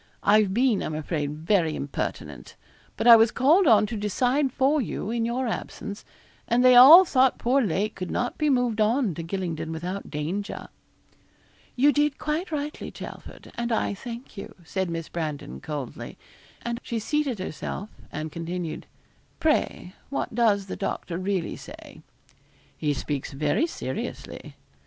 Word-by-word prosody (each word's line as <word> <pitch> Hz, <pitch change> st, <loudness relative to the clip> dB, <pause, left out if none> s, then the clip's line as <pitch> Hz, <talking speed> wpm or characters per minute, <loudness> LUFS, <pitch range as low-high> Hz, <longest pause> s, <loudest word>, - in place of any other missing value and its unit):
I've 210 Hz, -1 st, +4 dB
been, 235 Hz, 0 st, +2 dB
I'm 155 Hz, -, -3 dB
afraid, 150 Hz, -2 st, -2 dB
very 165 Hz, -1 st, +1 dB
impertinent; 140 Hz, -, -5 dB, 0.4 s
but -, -, -2 dB
I 235 Hz, -1 st, +11 dB
was 225 Hz, 0 st, +5 dB
called 310 Hz, -, +4 dB
on 220 Hz, -4 st, +6 dB
to 225 Hz, -, -5 dB
decide 250 Hz, +7 st, +1 dB
for 275 Hz, +4 st, +2 dB
you, 215 Hz, -2 st, -4 dB
in 230 Hz, -1 st, 0 dB
your 245 Hz, +3 st, -1 dB
absence, 210 Hz, -2 st, -5 dB, 0.4 s
and 245 Hz, +2 st, +3 dB
they 255 Hz, -1 st, +8 dB
all 305 Hz, +10 st, +11 dB
thought 260 Hz, -5 st, +3 dB
poor 260 Hz, +3 st, +2 dB
Lake 210 Hz, 0 st, -1 dB
could 185 Hz, -2 st, -6 dB
not 245 Hz, -, -2 dB
be 305 Hz, -1 st, 0 dB
moved 245 Hz, -5 st, +1 dB
on 225 Hz, -1 st, +2 dB
to 165 Hz, -, -6 dB
Gylingden 165 Hz, -2 st, -4 dB
without 180 Hz, +5 st, -5 dB
danger.' 170 Hz, +8 st, -4 dB, 1.1 s
'You 285 Hz, +3 st, +4 dB
did 295 Hz, -1 st, +1 dB
quite 315 Hz, +4 st, -3 dB
rightly, 300 Hz, 0 st, -4 dB
Chelford, -, -, -10 dB
and 235 Hz, 0 st, -3 dB
I 225 Hz, -, 0 dB
thank 235 Hz, +4 st, -9 dB
you,' 200 Hz, -, -8 dB
said 190 Hz, +2 st, -2 dB
Miss 165 Hz, -1 st, -4 dB
Brandon, 150 Hz, -, -5 dB
coldly; 145 Hz, -5 st, -6 dB, 0.5 s
and 235 Hz, 0 st, -3 dB
she 235 Hz, -, -4 dB
seated 280 Hz, +1 st, -1 dB
herself, 190 Hz, +2 st, -5 dB, 0.2 s
and 155 Hz, +1 st, -5 dB
continued 170 Hz, 0 st, -5 dB, 0.5 s
'Pray, 300 Hz, -, 0 dB, 0.2 s
what 275 Hz, -3 st, -3 dB
does 215 Hz, -4 st, +2 dB
the 190 Hz, -, -6 dB
doctor 170 Hz, 0 st, -4 dB
really 185 Hz, -2 st, -2 dB
say?' -, -, -12 dB, 0.7 s
'He 150 Hz, -2 st, -1 dB
speaks 140 Hz, 0 st, -4 dB
very 150 Hz, -, +1 dB
seriously.' 130 Hz, -, -6 dB
215 Hz, 150 wpm, -25 LUFS, 170-255 Hz, 1.1 s, I